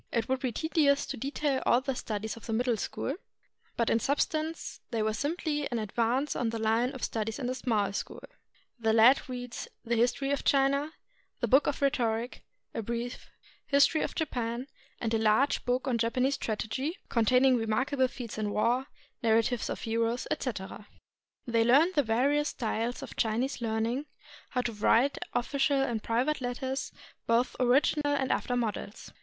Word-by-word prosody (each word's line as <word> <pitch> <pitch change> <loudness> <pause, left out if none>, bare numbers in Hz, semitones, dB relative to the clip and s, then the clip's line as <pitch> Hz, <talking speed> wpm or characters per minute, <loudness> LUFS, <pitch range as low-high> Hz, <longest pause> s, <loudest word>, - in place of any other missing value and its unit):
It 230 -1 0
would 260 0 0
be 255 -2 -1
tedious 285 +1 +2
to - - -4
detail 275 +1 -1
all 240 - +4
the 270 +1 -2
studies 215 -3 -4
of 230 - -12
the 225 - -2
Middle 240 +1 +1
School, 220 +7 -3 0.6
but 230 - +1
in 225 - +3
substance 310 +5 -1
they 225 -2 -1
were 215 0 0
simply 295 +2 -2
an 240 - -2
advance 235 +6 0
on 235 - 0
the 230 - -3
Hne 225 +3 +1
of 260 - -8
studies 220 -1 -2
of 260 - -4
the 250 - 0
Small 220 -6 0
School. - - -5 0.6
The 225 -1 +2
lads 245 +5 +5
read 245 -1 -6 0.3
the 235 +1 +1
"History 245 +4 +1
of 285 - -1
China," 280 +2 +2 0.5
the - - 0
"Book 270 +3 +5
of 280 - -1
Rhetoric," 235 -3 0 0.3
a - - -2
brief 235 +2 -5 0.4
"History 285 +3 +4
of - - -3
Japan," 245 -5 -2 0.3
and 230 -1 -2
a 225 - +2
large 220 +6 +3
book 250 +2 0
of 255 -3 +1
Japanese 250 +4 +1
strategy, 265 - -3
contain 250 +3 +3
ing 260 -2 +5
remarkable 255 +4 +1
feats 245 -3 -7
in 210 -1 -1
war, 240 +6 +1 0.3
narratives 230 +1 +2
of - - -4
heroes, 230 +1 -1
etc. 205 -4 -4 0.6
They 230 -1 +2
learned 285 +10 +5
the 295 - +4
various 280 +6 +2
styles 230 0 -2
of - - -9
Chinese 240 +4 0
learning, 230 +5 -1 0.4
how 250 - 0
to 240 -2 -3
write 230 +6 +3
official 275 +3 +1
and 240 -5 0
private 255 +7 0
letters, 260 +2 -3 0.4
both 235 +2 +2
original 290 +3 +3
and 265 -2 0
after 245 - 0
models. 220 -3 -3
245 Hz, 170 wpm, -29 LUFS, 225-275 Hz, 0.6 s, lads